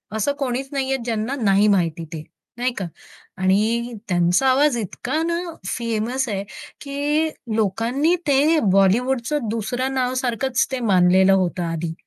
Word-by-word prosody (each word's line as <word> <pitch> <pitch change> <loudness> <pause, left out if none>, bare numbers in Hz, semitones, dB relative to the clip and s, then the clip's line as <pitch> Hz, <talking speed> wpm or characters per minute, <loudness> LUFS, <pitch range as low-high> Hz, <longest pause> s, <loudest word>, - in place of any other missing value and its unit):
असं 220 +7 0
कोणीच 265 0 -2
नाहीये 270 -1 -1
ज्यांना 230 +3 -2
नाही 200 0 +4
माहिती 170 -4 +1
ते, 155 -1 -6 0.3
नाही 245 0 0
का? 190 - -2 0.5
आणि 220 +6 +1 0.2
त्यांचा 175 +7 +2
आवाज 275 -1 +3
इतका 235 - -3
ना 340 +1 -1 0.3
फेमस 235 +3 -2
आहे 200 -1 -2 0.4
की 295 +3 0 0.3
लोकांनी 230 - +1
ते 295 +3 +4
बॉलिवूडचं 235 +7 +2
दुसरं 245 +4 -2
नावसारखच 255 0 0
ते 260 - -2
मानलेलं 185 +1 +5
होतं 180 -2 0
आधी. 165 0 -3
235 Hz, 130 wpm, -21 LUFS, 195-265 Hz, 0.5 s, मानलेलं